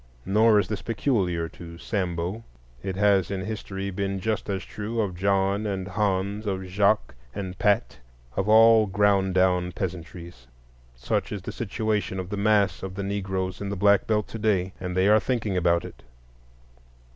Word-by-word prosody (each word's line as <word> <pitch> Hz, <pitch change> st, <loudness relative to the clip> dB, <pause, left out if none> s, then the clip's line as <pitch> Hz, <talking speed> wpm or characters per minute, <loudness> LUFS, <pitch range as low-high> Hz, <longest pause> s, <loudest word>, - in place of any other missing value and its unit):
Nor 110 Hz, +2 st, +4 dB
is 100 Hz, -, +2 dB
this 105 Hz, -1 st, -4 dB
peculiar 100 Hz, -7 st, 0 dB
to 85 Hz, 0 st, -11 dB
Sambo; 90 Hz, +2 st, -3 dB, 0.4 s
it 95 Hz, -1 st, -4 dB
has 100 Hz, -2 st, +3 dB
in 95 Hz, -1 st, -3 dB
history 100 Hz, -2 st, -5 dB
been 100 Hz, 0 st, -2 dB
just 110 Hz, +2 st, -2 dB
as 95 Hz, -3 st, -2 dB
true 110 Hz, +2 st, -5 dB
of 100 Hz, -5 st, -1 dB
John 100 Hz, +2 st, +1 dB
and 95 Hz, -1 st, -3 dB
Hans, 100 Hz, +1 st, -1 dB
of 95 Hz, -1 st, -2 dB
Jacques 100 Hz, +3 st, +1 dB, 0.2 s
and 95 Hz, -2 st, -5 dB
Pat, 100 Hz, -, +1 dB, 0.4 s
of 95 Hz, +2 st, -1 dB
all 110 Hz, 0 st, +7 dB
ground 95 Hz, -1 st, +2 dB
down 90 Hz, -1 st, +2 dB
peasantries. 85 Hz, -7 st, -7 dB, 0.5 s
Such -, -, -2 dB
is 100 Hz, -3 st, -5 dB
the -, -, -5 dB
situation 110 Hz, -3 st, -2 dB
of 90 Hz, -1 st, -5 dB
the -, -, -1 dB
mass 100 Hz, -2 st, +2 dB
of 95 Hz, -1 st, -6 dB
the 100 Hz, -, -3 dB
Negroes 95 Hz, -1 st, -3 dB
in 100 Hz, -, -3 dB
the 100 Hz, -, -3 dB
Black 100 Hz, +1 st, +3 dB
Belt 105 Hz, -1 st, +1 dB
to 115 Hz, -, -6 dB
day; 95 Hz, -4 st, +1 dB
and 90 Hz, 0 st, -4 dB
they 95 Hz, +1 st, +4 dB
are 105 Hz, +1 st, +6 dB
thinking 110 Hz, -5 st, -1 dB
about 85 Hz, -1 st, +2 dB
it. -, -, -11 dB
100 Hz, 170 wpm, -25 LUFS, 95-105 Hz, 0.5 s, all